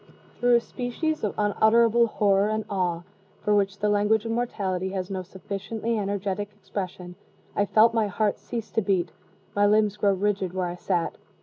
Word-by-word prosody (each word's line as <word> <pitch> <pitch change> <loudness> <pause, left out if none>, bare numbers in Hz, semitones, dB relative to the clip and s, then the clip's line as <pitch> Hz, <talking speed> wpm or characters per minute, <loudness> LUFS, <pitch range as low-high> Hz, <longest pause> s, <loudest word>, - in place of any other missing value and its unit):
Through 245 0 +4
a - - +6
species 260 +7 -3
of 210 - -1
unutterable 230 +3 +4
horror 205 -1 +2
and 215 0 -1
awe, 175 -3 -1 0.4
for 210 - +1
which 200 -1 +1
the 210 - 0
language 210 +1 +2
of 225 - -2
mortality 195 -6 -1
has 190 0 -3
no 190 -1 -2
sufficiently 200 +5 -4
energetic 200 0 -2
expression, 185 -3 -6 0.4
I 205 - +2
felt 225 +3 +5
my 225 -2 +2
heart 205 +1 0
cease 230 -2 -6
to 225 - +1
beat, 185 -4 0 0.4
my 205 0 +4
limbs 210 0 +3
grow 200 -1 +3
rigid 195 -2 -1
where 185 -1 0
I 175 0 -4
sat. 175 -1 -2
205 Hz, 175 wpm, -26 LUFS, 190-220 Hz, 0.4 s, a